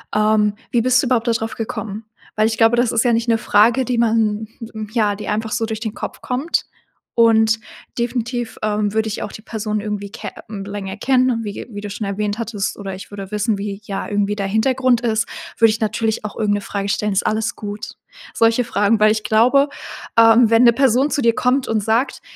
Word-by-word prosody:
ähm: 215 -1 +3 0.2
„Wie 240 -2 +2
bist 255 +1 +3
du 265 - -2
überhaupt 240 -1 +1
da - - +4
drauf 225 0 -3
gekommen?“ 220 -1 -5 0.3
Weil 215 0 +3
ich 225 0 -2
glaube, 225 +1 +4
das 240 -1 +2
ist 230 +1 +1
ja 240 - +3
nicht 230 +1 0
'ne 230 - +4
Frage, 225 +5 +3
die 245 0 -1
man 220 -2 +1 0.5
ja, 210 -4 +2
die 210 - -8
einfach 220 +1 -2
so 230 -2 0
durch 220 -1 -4
den 220 -1 -4
Kopf - - -7
kommt. 265 +7 -1 0.5
Und 225 -1 +4 0.4
definitiv, 240 -1 -2
ähm, 210 -1 0
würde 220 0 +1
ich 215 - -4
auch 210 - -6
die 215 - -11
Person 215 -2 -3
irgendwie 205 -1 -4
ke - - -6 0.2
mhm, 200 -2 -7
länger 200 -1 -6
kennen 255 +3 +2
und 230 -1 -2
wie 205 - -4
ge - - -8
wie 205 - -6
du 205 - -6
schon 205 0 -4
erwähnt 205 +2 -2
hattest 215 -3 -3
oder 195 -2 -6
ich 190 - -11
würde 195 -2 -7
wissen, 210 0 0
wie 200 -1 -4
ja 195 -1 -4
irgendwie 205 0 0
der 200 -1 -2
Hintergrund 245 +3 +2
ist, 230 -1 0 0.3
würde 225 - +6
ich 215 - -3
natürlich 220 0 -1
auch 210 - -6
irgend 205 -2 +1
'ne 205 - -2
Frage 200 0 -4
stellen: 210 0 0
„Ist 195 - 0
alles 220 0 -1
gut?“ 205 0 -7 0.4
Solche 230 +2 +3
Fragen, 210 -1 +1
weil 215 0 +5
ich 215 0 -1
glaube, 245 +7 +4 0.5
ähm, 230 0 +6
wenn 230 +1 +5
'ne 235 -1 +7
Person 265 +3 +2
zu 285 - 0
dir 230 -1 +3
kommt 255 +2 +1
und 215 -2 0
sagt: 225 +5 0
220 Hz, 225 wpm, -19 LUFS, 210-235 Hz, 0.5 s, ne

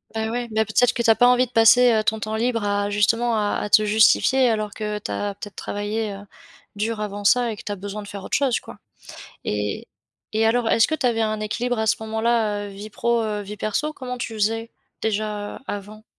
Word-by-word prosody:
Bah, 220 0 -2
ouais, 240 0 -3
bah, 220 0 +1
peut-être 240 +3 +3
que 235 - -1
tu 230 - +2
as - - +4
pas 245 - +5
envie 250 0 +4
de 245 - -19
passer, 245 +1 +6
heu, 215 -1 +2
ton 220 0 0
temps 215 +1 -3
libre 230 0 0
à, 205 0 0
justement, 230 +3 +2
à 210 -1 0
à 210 - -3
te 215 +1 +5
justifier, 220 +4 +4
alors 215 -2 -1
que 210 -1 -3
tu 210 - -6
as 205 -1 -3
peut-être 205 0 -9
travaillé, 210 +1 -3
heu, 200 +1 -10 0.5
dur 215 +2 -2
avant 205 -1 -4
ça 240 +3 +3
et 215 - -7
que - - -9
tu 210 - -5
as - - -2
besoin 205 +2 -6
de 205 - -10
faire 200 -1 -8
autre - - -2
chose 265 -4 +1
quoi? - - -12 0.7
Et 105 -1 -3 0.5
et 220 +1 +2
alors, 230 +1 +2
est-ce 225 - +4
que 315 - +1
tu 285 - -2
avais 230 -2 +1
un 215 -1 -1
équilibre 240 +3 -2
à 220 - 0
ce - - +4
moment-là, 220 -1 0
heu, - - -7
vie 200 +2 -9
pro, 235 +2 0
heu, 210 -1 -2
vie 205 +1 -7
perso? 215 +9 -2
Comment 250 -3 -6
tu 240 -2 -5
faisais, 225 +2 -1 0.3
déjà 210 -1 -2
avant? 210 +2 -7
220 Hz, 235 wpm, -23 LUFS, 205-230 Hz, 0.7 s, passer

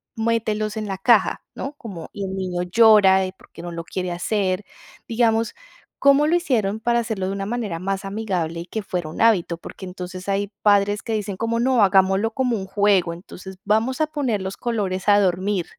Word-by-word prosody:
mételos 220 -2 -1
en 215 -1 -3
la 195 -1 -3
caja", 215 -1 +3
¿no?, 275 - -5
como 200 - -9
que 205 - -7
el 190 0 -4
niño 185 -2 -2
llora 195 -1 +6 0.2
porque - - -14
no 175 - -6
lo 170 0 -5
quiere 180 +1 -4
hacer, 185 +2 -1 0.4
digamos, 225 -1 +1 0.4
¿cómo 280 +2 +5
lo 330 - +3
hicieron 220 - 0
para 235 +1 +2
hacerlo 220 -5 -2
de - - -2
una 195 0 -3
manera 210 -6 -3
más 195 +2 -3
amigable 195 -5 -3
y 170 - -6
que 215 +4 -5
fuera 180 -5 -3
un 155 - -6
hábito?, 190 -7 +3
porque 190 - -10
entonces 185 0 -8
hay 200 +1 -1
padres 205 0 +3
que 225 - -4
dicen 205 -3 -3
como: 230 +2 -1
"No, 250 -1 +3
hagámoslo 195 +2 +3
como 250 -1 0
un 190 - -5
juego, 195 -4 +2
entonces 185 +2 -11
vamos 225 +7 +1
a 310 - +2
poner 275 -9 -1
los 190 +1 -5
colores 200 -6 -2
a 205 0 +6
dormir", 185 0 0
205 Hz, 195 wpm, -22 LUFS, 185-225 Hz, 0.4 s, llora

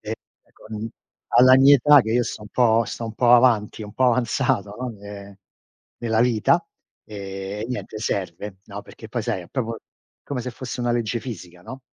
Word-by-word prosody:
E - - -8 0.4
e - - -30
con 110 0 -7 0.5
alla 130 +1 +8
mia 140 +2 +7
età 145 +2 +6
che 110 -1 -2
io 120 - +3
sto 110 - -6
un 105 - -11
po' 115 0 +3
sto 115 +1 -6
un 110 - -6
po' 120 0 +3
avanti, 120 -4 +3
un 105 -1 -9
po' 130 - +1
avanzato, 115 -4 +1
no, 125 0 -3
ne 100 -2 -11 0.6
nella 115 -2 0
vita, 115 -3 +2 0.4
ehm, 100 +1 -6
niente, 125 -3 -5
serve, 95 -2 -4
no, 100 0 -8
perché 110 +2 -13
poi 120 +1 -3
sai 110 -5 -2
è 85 - -15
proprio 115 -4 -3 0.4
come 140 -3 -4
se 125 +1 -5
fosse 125 +1 -7
una 120 0 0
legge 120 0 -1
fisica, 90 -7 -9
no. 130 +8 -9
115 Hz, 190 wpm, -23 LUFS, 105-125 Hz, 0.6 s, alla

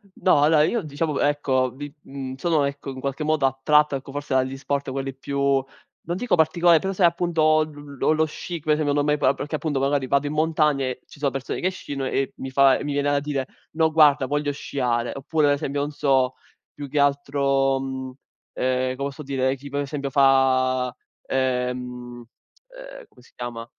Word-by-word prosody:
No, 180 -6 +3
allora 150 0 +5
io 230 +8 +1
diciamo 150 0 -2
ecco 135 -3 +1
vi 145 +3 -8
mhmm, 135 -1 -7
sono 155 0 +1
ecco 140 0 -5
in 130 -1 -7
qualche 140 +3 -3
modo 155 -2 +1
attratto 145 +3 +3
ecco, 135 0 -7
forse 145 0 -4
dagli 130 0 +1
sport 140 0 -3
quelli 135 0 -4
più 140 +1 -4 0.7
non 175 +2 -3
dico 245 +2 +1
particolari 170 +1 +4
però 195 - -2
sai 185 -2 +2
appunto 165 -2 +3
l 145 -2 -11
l - - +3
lo 160 0 +2
sci, 170 +2 -6
come 155 0 +1
esempio 150 -1 0
non 145 0 +1
mai 150 0 +2
proa 135 -1 +3
perché 145 +2 -4
appunto 150 -2 -2
magari 135 0 0
vado 140 +2 +1
in 145 - -3
montagna 155 -2 +2
e 130 -1 -3
ci - - -16
sono 140 -1 0
persone 135 -1 -4
che 185 - +2
sciano 145 -7 -6
e 135 0 -1
mi 130 - -6
fa 135 0 +5
e - - -6
mi 145 - -3
viene 145 0 +1
da 145 0 +1
dire: 140 -2 -3 0.2
"No 160 0 +1
guarda 150 -3 +5
voglio 145 +1 -1
sciare". 120 -4 -2
Oppure 150 +2 0
ad 145 - +4
esempio 140 0 -2
non 145 - -4
so, 135 -3 +1 0.4
più 145 -1 -8
che 145 - -1
altro, 140 -1 +2
mhmm, 130 -1 -5 0.5
ehm, 130 0 0
come 140 +1 -2
posso 140 +2 -8
dire? 135 -1 0
Chi 140 +1 -11
per 140 +1 -2
esempio 140 -1 -4
fa, 130 -2 +3 0.3
ehm, 125 -1 0
uhm, 120 -1 -9 0.8
come 125 - -21
si 125 - -22
chiama? 120 -1 -6
140 Hz, 200 wpm, -23 LUFS, 130-150 Hz, 0.8 s, allora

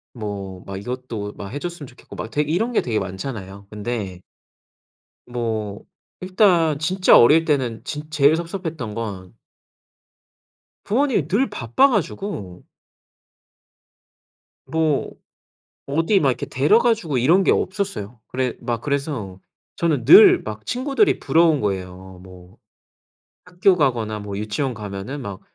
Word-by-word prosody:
뭐 100 -4 -6
막 95 -1 -6
이것도 115 -1 -5
막 100 - -8
해 145 - -4
줬으면 175 -3 -6
좋겠고 125 - -14
막 110 - -6
되 150 - +1
이런 175 +11 0
게 235 - +2
되게 110 -3 -1
많잖아요. 95 0 -7
근데 105 -4 -5 1.1
뭐 110 -4 -4 0.4
일단 185 -5 +3
진짜 185 +4 +4
어릴 155 +7 +6
때는 125 -7 -1
진 150 +3 -6
제일 150 0 +4
섭섭했던 165 - -5
건 100 -5 -6 1.5
부모님이 235 - +1
늘 215 +11 +1
바빠 120 - +2
가지고 195 - -3 2.0
뭐 160 -3 0 0.8
어디 165 +8 +2
막 140 - +2
이렇게 125 - -4
데려가 220 - +3
주고 160 - -3
이런 165 +11 +4
게 - - +4
없었어요. 185 - -3
그래 130 -1 -2
막 120 -2 -3
그래서 135 -10 -3 0.4
저는 155 -8 0
늘 160 - +8
막 105 0 -8
친구들이 275 - +1
부러운 165 -2 +3
거예요. 95 -2 -5
뭐 90 0 -15 0.9
학교 180 +1 +2
가거나 120 -8 0
뭐 100 -1 -6
유치원 110 +5 -2
가면은 105 +6 -6
막 100 -4 -7
130 Hz, 250 characters per minute, -21 LUFS, 105-165 Hz, 2.0 s, 늘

